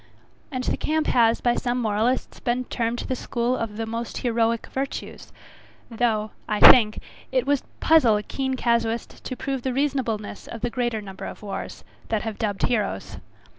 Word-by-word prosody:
And 255 -2 -3
the - - 0
camp 310 0 0
has 230 -1 +3
by 240 - +3
some 245 0 -1
moralists 225 +3 0
been 250 +1 -1
termed 235 0 -1
the 260 - -1
school 245 0 -1
of 220 -4 -4
the 225 - -2
most 230 +1 -4
heroic 230 -1 +1
virtues; 270 +1 -5 0.6
though, 220 -2 0 0.2
I 210 -1 0
think, 215 -4 +8 0.3
it 255 -1 +1
would 285 -1 +2 0.2
puzzle 305 -9 +5
a 210 - -4
keen 265 +3 -2
casuist 235 -2 -1
to 255 - -4
prove 270 -2 -3
the 260 +1 -2
reasonableness 250 -7 -2
of 230 - -7
the 240 - -1
greater 240 -3 -1
number 195 -1 -8
of - - -8
wars, 200 - -6 0.3
that 220 -2 0
have 220 -2 -5
dubbed 205 -3 -2
heroes. 220 -5 -1
235 Hz, 170 wpm, -24 LUFS, 220-255 Hz, 0.6 s, think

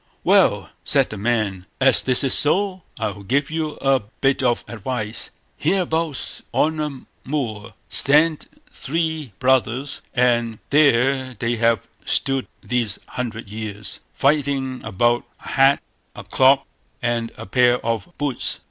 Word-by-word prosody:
"Well!" - - +3
said - - +4
the 105 - -6
man, 105 -4 -1
"as 135 -1 +5
this 130 0 +3
is 135 - +2
so, 190 +4 +1 0.2
I'll 100 0 -3
give 140 +9 0
you 155 -1 -2
a 135 -1 +3
bit 135 +6 -1
of 120 -2 +1
advice. 110 -1 -3 0.3
Hereabouts, 165 -6 -1
on 155 0 +1
a 145 -4 -4 0.3
moor, 115 -8 -3
stand 150 +2 +4 0.3
three 160 -2 -2
brothers, 130 +1 +1
and 120 -2 +2
there 135 -2 +3
they 120 +2 -1
have 115 0 +1 0.2
stood 135 -1 0 0.2
these 120 -5 -1
hundred 115 -3 -5
years, 105 -1 -6
fighting 140 -2 0
about 120 +4 +1 0.2
a - - -7
hat, 135 +1 +4 0.3
a - - -8
cloak, 135 +1 +4 0.4
and 115 -1 -1
a - - -8
pair 125 +4 +3
of 115 +8 -2
boots. 145 -4 -1
130 Hz, 130 wpm, -21 LUFS, 115-140 Hz, 0.4 s, as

